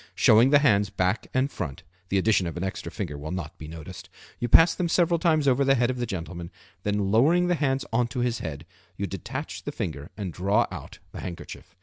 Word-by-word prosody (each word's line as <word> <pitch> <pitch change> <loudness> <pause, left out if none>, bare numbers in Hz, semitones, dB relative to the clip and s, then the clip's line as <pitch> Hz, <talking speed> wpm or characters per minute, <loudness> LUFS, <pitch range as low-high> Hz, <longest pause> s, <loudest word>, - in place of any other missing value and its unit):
Showing 115 +4 +6
the 145 - +7
hands 105 -9 +3
back 95 +1 -1
and 130 +2 +1
front 70 -8 -5 0.3
(the 100 - +1
addition 95 -2 +2
of 85 - -5
an 85 - -3
extra 95 - -4
finger 80 -9 -5
will 75 +2 -6
not 85 -3 -5
be 80 - -8
noticed), 80 +3 -9 0.3
you 120 - -1
pass 165 +8 +7
them 175 -2 -2
several 170 0 +2
times 155 -4 +2
over 135 +1 +4
the 135 0 +4
head 120 0 +2
of 125 - -5
the 120 - -1
gentleman, 85 -3 -5 0.3
then 105 -1 0
lowering 155 +11 +4
the - - +4
hands 135 -4 0
on 120 +1 +2
to 120 +1 -3
his 120 -1 0
head 80 -1 -6 0.3
you 100 - -2
detach 115 +10 -6
the 145 - -5
finger 80 - -5
and 95 -5 -4
draw 100 +3 +2
out - - -8
the - - -8
handkerchief. 85 -2 -8
105 Hz, 225 wpm, -26 LUFS, 90-135 Hz, 0.3 s, the